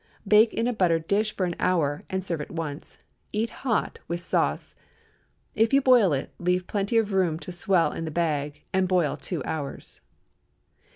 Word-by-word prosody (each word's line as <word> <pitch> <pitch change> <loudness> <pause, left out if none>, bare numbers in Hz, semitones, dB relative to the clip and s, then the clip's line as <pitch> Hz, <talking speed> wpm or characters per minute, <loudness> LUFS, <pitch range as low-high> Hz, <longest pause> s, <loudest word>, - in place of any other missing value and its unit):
Bake 215 +2 +6
in 230 - -1
a 245 - +1
buttered 170 -6 +1
dish 215 +2 +1
for 185 - 0
an 175 -1 -3
hour, 155 -5 +1
and 190 0 -2
serve 165 -5 -2
at - - -7
once. 160 -3 -6 0.3
Eat 220 +2 -1
hot, 240 -5 -1
with 170 0 -2
sauce. 175 - -1 0.8
If 225 +3 +2
you 275 - +5
boil 245 -9 +5
it, 140 -2 -2
leave 180 +1 0
plenty 205 +3 -1
of 215 -3 +1
room 180 -5 +2
to 180 - -8
swell 175 0 +2
in 165 - -5
the - - -3
bag, 150 -3 -2
and 190 0 +2
boil 180 -5 +1
two 165 -7 -4
hours. 145 -3 -6
180 Hz, 180 wpm, -26 LUFS, 165-210 Hz, 0.8 s, Bake